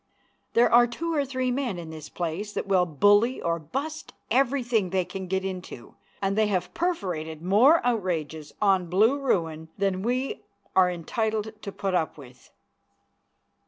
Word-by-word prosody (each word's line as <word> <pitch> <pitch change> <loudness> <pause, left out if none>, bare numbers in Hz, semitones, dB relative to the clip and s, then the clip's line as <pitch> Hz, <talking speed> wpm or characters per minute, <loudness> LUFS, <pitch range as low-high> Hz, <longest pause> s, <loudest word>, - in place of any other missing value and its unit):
There 235 +1 +4
are 240 0 +7
two 330 +8 -3
or 290 -3 +2
three 255 -1 -1
men 245 -7 -2
in 165 -2 -7
this 155 -1 -9
place 180 +5 -4
that - - -3
will 185 -2 +2
bully 205 - +3
or 170 0 -1
bust 290 - -5 0.2
everything 245 -5 +2
they 185 0 0
can 185 +1 -6
get 190 +1 -1
into, 180 -10 -7 0.3
and 195 0 +1
they 215 0 +3
have 185 -3 -1
perforated 175 - -2
more 240 - +5
outrages 165 -9 -2
on 190 -4 +2
Blue 220 +10 +3
Ruin 160 - -1
than 195 -1 0
we 250 +5 -1 0.3
are 185 -1 +5
entitled 215 +5 -2
to 200 - -6
put 195 -1 -3
up 165 -4 0
with. 130 -3 -15
195 Hz, 160 wpm, -26 LUFS, 175-240 Hz, 0.3 s, are